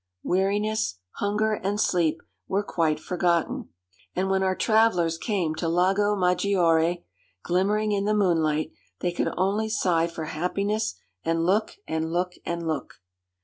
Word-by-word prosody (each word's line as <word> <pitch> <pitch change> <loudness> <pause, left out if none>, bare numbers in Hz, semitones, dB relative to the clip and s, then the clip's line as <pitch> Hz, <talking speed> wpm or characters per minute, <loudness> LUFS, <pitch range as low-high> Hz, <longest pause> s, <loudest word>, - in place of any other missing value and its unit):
Weariness, 200 - 0 0.2
hunger, 210 +2 +1
and 205 0 -2
sleep 165 -5 +1 0.2
were 200 +2 0
quite 160 -6 0
forgotten; 175 0 0 0.5
and 190 +1 0
when 190 0 +2
our 190 0 +1
travellers 185 -8 +2
came 185 -8 -1
to 170 - -1
Lago 195 +4 +2
Maggiore, 175 -3 +2 0.4
glimmering 205 +4 +1
in 200 -1 0
the 210 +1 +2
moonlight, 160 -6 +1 0.3
they 175 - 0
could 175 - -1
only 205 +4 +1
sigh 170 -6 +2
for 165 -2 -6
happiness, 180 - -1 0.3
and 165 0 0
look 205 +5 +1
and 160 0 -2
look 180 +1 0
and 170 0 -2
look. 160 -1 -3
180 Hz, 140 wpm, -26 LUFS, 165-205 Hz, 0.5 s, when